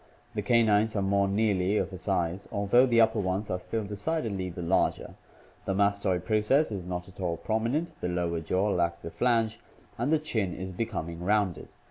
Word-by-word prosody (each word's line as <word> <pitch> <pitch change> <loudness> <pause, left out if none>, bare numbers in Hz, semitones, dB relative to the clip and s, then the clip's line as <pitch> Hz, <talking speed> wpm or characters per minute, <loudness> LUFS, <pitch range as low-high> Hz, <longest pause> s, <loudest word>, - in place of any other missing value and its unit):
The 105 - -2
canines 110 0 +3
are 100 - +1
more 100 0 +2
nearly 100 -1 +1
of 95 -1 -1
a - - -5
size; 90 -1 -1
although 100 +6 +4
the 120 -2 +3
upper 110 -1 +4
ones 95 +2 -1
are 90 - -1
still 110 +3 -3
decidedly 100 - -2
the 90 0 -6
larger. 90 +3 0 0.5
The 95 - -1
mastoid 100 -2 +1
process 110 +7 +2
is 95 -4 -5
not 90 -1 -4
at 95 - -16
all 85 -3 -1
prominent, 115 - -1
the 90 - -1
lower 85 -1 -1
jaw 95 +5 0
lacks 85 -2 +1
the 85 - -8
flange, 115 -1 +1 0.4
and 145 - 0
the 160 - +5
chin 110 - -2
is 95 +1 -5
becoming 85 -4 -4
rounded. 100 -2 +1
100 Hz, 185 wpm, -28 LUFS, 90-110 Hz, 0.5 s, the